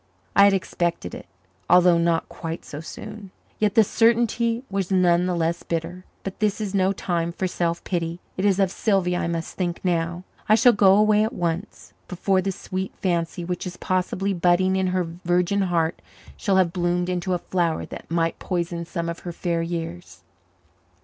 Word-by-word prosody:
I 200 - +8
had 200 - +5
expected 170 - -2
it, - - -9 0.4
although 180 -1 +6
not 170 -1 +1
quite 165 -1 -6
so 145 - -7
soon. 205 +5 -9 0.3
Yet 210 -2 +1
the 225 - +7
certainty 230 +2 +2
was 195 -2 -2
none 180 -2 +3
the 180 - 0
less 170 0 0
bitter. 170 +2 -4 0.2
But 195 - -6
this 210 -1 +1
is 205 -2 -3
no 190 -1 +3
time 170 -3 -1
for 185 - -3
self 170 -2 -1
pity. 170 -1 -2 0.2
It 185 - -3
is 200 -2 +3
of 195 -2 +2
Sylvia 190 -5 +1
I - - -1
must 165 -1 -4
think 175 -2 -2
now. 175 0 0 0.3
I 215 - +7
shall 245 +2 +6
go 195 -2 +5
away 210 0 +4
at 220 - -2
once, 175 -1 -4
before 190 +1 +1
the 195 +1 -1
sweet 190 +1 -5
fancy 170 -1 -1
which 180 +1 -3
is 180 - -7
possibly 185 +1 -1
budding 180 +1 +3
in 190 0 +1
her 185 0 +1
virgin 175 +3 0
heart 170 -3 0 0.3
shall 195 - 0
have 175 -3 +3
bloomed 175 0 0
into 180 0 -1
a - - +1
flower 175 -2 -1
that - - -10
might 165 0 0
poison 170 -2 -2
some 170 0 -4
of 170 0 -4
her 175 - -6
fair 170 0 -1
years. 165 - -5
180 Hz, 185 wpm, -24 LUFS, 170-195 Hz, 0.4 s, I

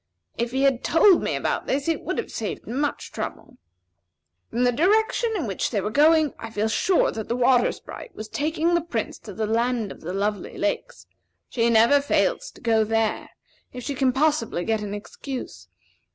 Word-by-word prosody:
If 235 0 -1
he 265 +2 -1
had 270 -3 +2
told 350 +2 +5
me - - -1
about - - -2
this, 275 +2 -1
it 330 - 0
would - - -3
have - - -3
saved - - -4
much 280 +4 -2
trouble. 255 -4 -6 0.9
From 240 - 0
the 245 - +4
direction 435 - +2
in 350 - -1
which 195 -4 -2
they 215 - -1
were 210 +2 -2
going, 305 +2 +4
I 225 - -6
feel 220 0 -1
sure 360 - +2
that 220 -1 -6
the 235 - -1
Water 245 0 +4
Sprite 485 - -10
was 215 - -7
taking 315 +7 0
the 340 - +3
Prince 250 -9 -4
to 210 - -10
the 220 - -1
Land 230 -1 0
of - - -11
the 175 - -5
Lovely 200 +1 -2
Lakes. - - -3 0.4
She 235 -1 +1
never 235 +5 +5
fails - - +1
to - - -18
go 225 -2 +3
there, 225 0 0 0.4
if 250 -1 -7
she 285 - -3
can 265 -1 +2
possibly 265 - 0
get 220 -1 0
an 205 -1 -4
excuse. 210 - -7
250 Hz, 195 wpm, -24 LUFS, 220-305 Hz, 0.9 s, told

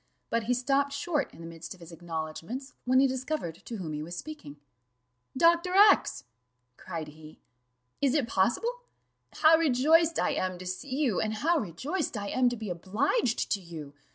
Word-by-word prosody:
But 230 -1 0
he 245 +2 +2
stopped 275 +3 +1
short 290 0 -1
in - - -14
the - - -8
midst 165 +1 -8
of - - -21
his 170 0 -12
acknowledgments, 165 - -6
when 255 +1 +4
he 275 - +6
discovered 260 - -3
to 235 - -6
whom 165 -6 -5
he 150 - -3
was 170 +3 -6
speaking. 175 - -8 0.8
"Dr. 340 +4 +4
X 405 - +5 0.3
!" 125 0 -49
cried 165 -4 -6
he. 155 +1 -14 0.6
"Is 275 -1 +3
it 280 -6 +1
possible? 455 - 0 0.5
How 320 +1 +5
rejoiced 320 +3 +4
I - - +1
am 185 -1 -2
to 185 - -9
see 185 +10 -5
you, 265 -9 +1
and 220 0 -1
how 325 +9 +2
rejoiced 260 - -3
I 200 -1 -4
am 255 -1 +3
to 240 - -4
be 215 -4 -5
obliged 225 - 0
to 200 - +1
you! 160 -5 -9
230 Hz, 180 wpm, -29 LUFS, -, 0.8 s, he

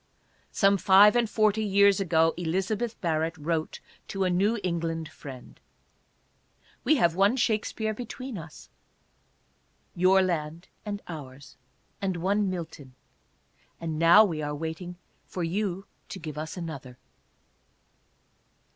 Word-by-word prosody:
Some 200 -1 +3
five 200 +4 +7
and 240 -2 +2
forty 215 0 +2
years 200 0 +4
ago 165 -3 +2
Elizabeth 190 +7 -2
Barrett 165 -1 -1
wrote 160 +1 -2 0.3
to 195 -1 -2
a 185 - +1
New 200 +6 +2
England 165 -2 -2
friend: 130 -4 -11 1.2
"We 310 - +4
have 170 - +3
one 200 +6 +3
Shakspere 220 -2 0
between 250 +2 -7
us 160 -4 -10 0.6
— - - -42
your 190 +1 +6
land 165 -1 -3 0.2
and 205 0 -4
ours 140 -4 -9 0.2
— - - -41
and 190 -3 -1
one 200 +3 +1
Milton. 160 -7 -7 0.8
And 160 -2 -4
now 170 +6 +7
we 160 -6 -3
are 150 0 -3
waiting 160 +3 -5 0.3
for 180 - -4
you 195 +2 -2 0.2
to - - -6
give 155 -5 -7
us 155 +3 -6
another." 140 -7 -7
180 Hz, 130 wpm, -27 LUFS, 160-200 Hz, 1.2 s, five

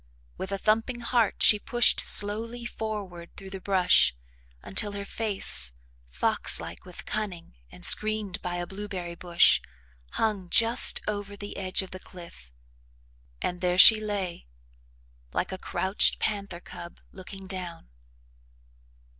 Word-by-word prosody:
With 190 - -6
a 195 - -2
thumping 225 +4 0
heart 235 -3 0
she 210 - +7
pushed 240 +1 +4
slowly 230 +4 -1
forward 205 -7 -7
through 195 -1 -10
the 190 -1 -7
brush 185 - +3 0.5
until 205 +2 +1
her 200 0 -6
face, 190 - +1 0.3
fox 60 0 0
like 85 +1 -9
with 180 -1 -11
cunning 195 - -5 0.2
and 90 - -5
screened 215 -2 +1
by 175 0 -4
a 175 0 -4
blueberry 190 -3 -7
bush, 170 0 +3 0.5
hung 205 -5 -2
just 230 +4 +4
over 205 -1 -4
the 205 0 -8
edge 190 0 -1
of 190 - -12
the 185 - -8
cliff, 170 - -14 0.9
and 180 0 -3
there 180 -1 0
she 215 +3 +10
lay, 195 - -4 0.9
like - - -2
a 190 - -6
crouched 190 +2 +1
panther 200 -4 -3
cub, 170 -1 -11
looking 190 +1 -11
down. 180 - -7
195 Hz, 135 wpm, -26 LUFS, 180-215 Hz, 0.9 s, she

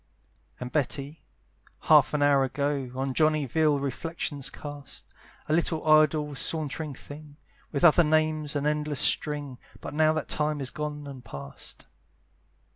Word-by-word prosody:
And 125 0 -6
Betty, 145 +1 -2 0.6
half - - +5
an 145 - +1
hour 140 -1 +4
ago, 140 0 -2
On 135 0 -2
Johnny 155 0 +2
vile 150 +3 +2
reflections 140 0 -2
cast; 145 0 -10 0.4
"A 150 - 0
little 160 -1 0
idle 155 -1 +4
sauntering 150 0 -1
thing!" 145 +1 -12 0.3
With 140 - -1
other 175 0 +7
names, 155 -1 +1
an 145 0 -1
endless 150 -1 -1
string, 145 -4 +1 0.2
But - - -8
now 155 +1 +3
that 155 -2 -3
time 150 0 -1
is 135 -2 -2
gone 150 -1 -5
and 135 -3 -9
past. 70 - -9
150 Hz, 140 wpm, -27 LUFS, 140-155 Hz, 0.6 s, other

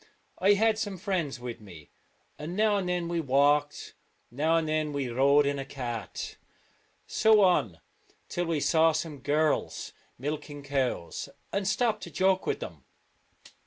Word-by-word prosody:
I 195 +2 +5
had 220 +1 +2
some 205 -3 -3
friends 180 - -2
with 120 -2 -7
me, 85 -8 -13 0.5
and 160 +4 -5
now 210 -1 +3
and 185 -2 -2
then 175 -1 -1
we 170 -1 -1
walked, 145 +1 +2 0.4
now 155 +6 +2
and 160 -1 0
then 155 -1 0
we 140 -3 -2
rode 140 +4 +4
in 140 0 0
a - - -3
cart. 120 -5 -6 0.7
So 220 -1 +4
on 115 - +2 0.5
till 175 - -2
we 160 -3 0
saw 160 +1 +4
some 155 -2 -3
girls 150 +3 0 0.2
milking 145 +1 -5
cows, 135 -10 -2 0.2
and 200 -1 0
stopped 215 +1 +1
to - - -7
joke 190 0 +1
with - - -1
them. - - -8
155 Hz, 155 wpm, -28 LUFS, 140-185 Hz, 0.7 s, I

